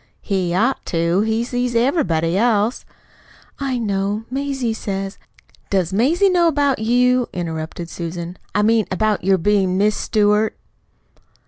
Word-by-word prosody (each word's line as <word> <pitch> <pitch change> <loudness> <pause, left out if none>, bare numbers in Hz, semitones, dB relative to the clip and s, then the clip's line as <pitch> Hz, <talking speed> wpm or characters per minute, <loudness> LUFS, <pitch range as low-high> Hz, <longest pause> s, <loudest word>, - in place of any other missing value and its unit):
"He 190 -4 -1
ought 225 +9 +1
to. 170 +2 +1
He 220 +1 0
sees 245 0 -2
everybody 230 - +1
else." 220 +1 +1 0.7
"I 270 -2 -1
know. 205 -1 -1
Mazie 270 -3 -2
says 195 -2 -4 0.2
" - - -30
"Does 190 -2 0
Mazie 305 - +3
know 355 -2 +3
about 285 -5 +1
you?" 245 +2 +2
interrupted 165 -1 -5
Susan. 170 +1 -6 0.2
"I 210 - +3
mean, 220 0 +3
about 210 +1 0
your 190 +1 +3
being 190 0 +1
'Miss 210 +2 +2
Stewart'?" 210 0 +1
210 Hz, 135 wpm, -20 LUFS, 185-245 Hz, 0.7 s, Mazie